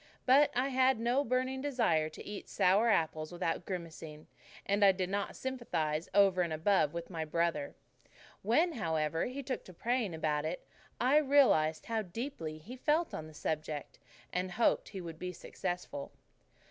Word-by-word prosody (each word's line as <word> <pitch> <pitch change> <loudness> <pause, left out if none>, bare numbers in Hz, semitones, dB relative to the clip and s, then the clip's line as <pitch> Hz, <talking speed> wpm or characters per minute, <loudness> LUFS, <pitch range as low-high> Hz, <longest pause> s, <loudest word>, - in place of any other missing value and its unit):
But 275 +3 +6
I 255 +3 +1
had 260 -2 +3
no 245 +4 +2
burning 260 +1 -1
desire 225 - +1
to 155 - -11
eat 205 -1 -7
sour 200 +6 +3
apples 155 -5 +1
without 175 -1 -2
grimacing, 165 -4 -6 0.4
and 200 +1 +2
I 195 - +8
did 185 -1 -3
not 200 0 -2
sympathize 170 -12 -2
over 195 -2 +5
and 170 -2 0
above 160 -1 +2
with 170 +3 -6
my 165 -2 -3
brother. 160 -2 -1 0.7
When, 305 - +3
however, 160 - -1
he 270 +3 -5
took 255 -1 -3
to 185 - -12
praying 230 -4 -1
about 150 -2 0
it, 160 +3 -4 0.3
I 260 +4 +4
realized 265 - +4
how 225 -1 -1
deeply 180 - -5
he 210 +11 -10
felt 305 +6 +1
on 155 - -5
the 155 - -14
subject, 155 -1 -4 0.3
and 180 0 -2
hoped 230 +3 +2
he 195 - -6
would 165 -2 -8
be 180 0 -4
successful. 175 -5 -5
185 Hz, 165 wpm, -33 LUFS, 160-250 Hz, 0.7 s, I